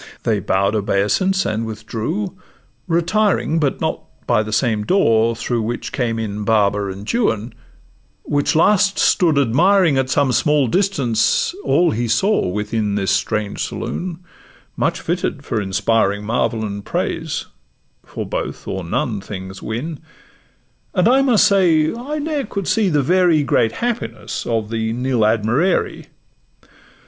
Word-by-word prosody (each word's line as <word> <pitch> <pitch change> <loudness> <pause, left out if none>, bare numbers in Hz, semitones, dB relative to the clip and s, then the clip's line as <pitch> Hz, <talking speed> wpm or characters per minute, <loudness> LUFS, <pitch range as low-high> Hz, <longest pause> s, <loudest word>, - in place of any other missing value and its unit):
They 110 -3 +1
bow'd 100 +2 +1
obeisance 110 - +1
and 110 +1 -1
withdrew, 115 - -4 0.5
retiring, 170 0 +1
But 145 -3 -1
not - - -1 0.2
by - - +2
the 110 0 -5
same 110 -2 +1
door 115 - +3
through 115 +1 -2
which 120 +2 -4
came 115 -3 -1
in 105 -2 -4
Baba 105 -2 +2
and 100 +2 -7
Juan, 115 - 0 0.7
which 145 +1 0
last 195 +4 +3
stood 165 -6 +3
admiring, 155 - +3
At 130 -1 -1
some 140 0 +2
small 150 +1 +2
distance, 140 - +1
all 175 -1 +3
he 120 +2 -1
saw 195 - +2
within 105 +2 -2
This 95 -2 0
strange 100 +1 -1
saloon, 175 -2 -4 0.6
much - - 0
fitted - - -3
for 110 - -1
inspiring 100 +1 0
Marvel 115 0 0
and 100 -1 -5
praise; - - -3 0.6
for - - -6
both - - -5
or 95 -1 -3
none 100 +5 -2
things 95 -1 -8
win; 140 +8 -4 1.0
And 180 +1 +3
I 260 +3 +5
must 250 -6 +4
say, 165 -6 +3
I 270 +6 -5
ne'er 295 -4 -2
could 200 -3 -4
see 215 -4 +2
the 150 -4 +2
very 175 -1 +3
Great 115 -4 +1
happiness 115 - -4
of 115 -2 -1
the 110 0 -1
'Nil 125 0 -1
Admirari. 115 - +1
120 Hz, 140 wpm, -19 LUFS, 105-175 Hz, 1.0 s, I